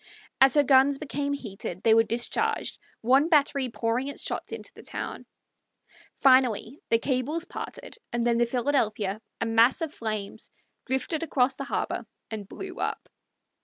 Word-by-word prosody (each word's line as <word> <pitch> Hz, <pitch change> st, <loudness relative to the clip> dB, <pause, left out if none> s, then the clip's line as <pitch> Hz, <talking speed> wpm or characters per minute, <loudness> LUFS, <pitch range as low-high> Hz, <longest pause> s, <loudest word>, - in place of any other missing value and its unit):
As 270 Hz, +1 st, +7 dB
her 290 Hz, -, +6 dB
guns 275 Hz, +1 st, +5 dB
became 285 Hz, -1 st, -3 dB
heated 195 Hz, -7 st, -6 dB
they 225 Hz, -, +6 dB
were 225 Hz, -, +7 dB
discharged, 230 Hz, +2 st, -1 dB, 0.2 s
one 270 Hz, +7 st, +4 dB
battery 285 Hz, -4 st, +3 dB
pouring 230 Hz, +3 st, -1 dB
its 280 Hz, -, -3 dB
shots -, -, -4 dB
into -, -, -7 dB
the -, -, -13 dB
town. -, -, -6 dB, 0.9 s
Finally 255 Hz, -, +4 dB
the 230 Hz, -, +5 dB
cables 275 Hz, +7 st, -1 dB
parted, 465 Hz, -, -8 dB
and 240 Hz, 0 st, -1 dB
then 235 Hz, -1 st, +2 dB
the 240 Hz, -, +3 dB
Philadelphia, 225 Hz, -5 st, 0 dB, 0.2 s
a -, -, 0 dB
mass 225 Hz, +2 st, +4 dB
of 320 Hz, -2 st, -3 dB
flames, 215 Hz, -1 st, -4 dB, 0.4 s
drifted 265 Hz, +4 st, -1 dB
across 265 Hz, -5 st, +1 dB
the 275 Hz, -, -5 dB
harbor, -, -, -3 dB, 0.2 s
and 210 Hz, -3 st, -6 dB
blew -, -, -8 dB
up. -, -, -3 dB
255 Hz, 155 wpm, -27 LUFS, 225-280 Hz, 0.9 s, As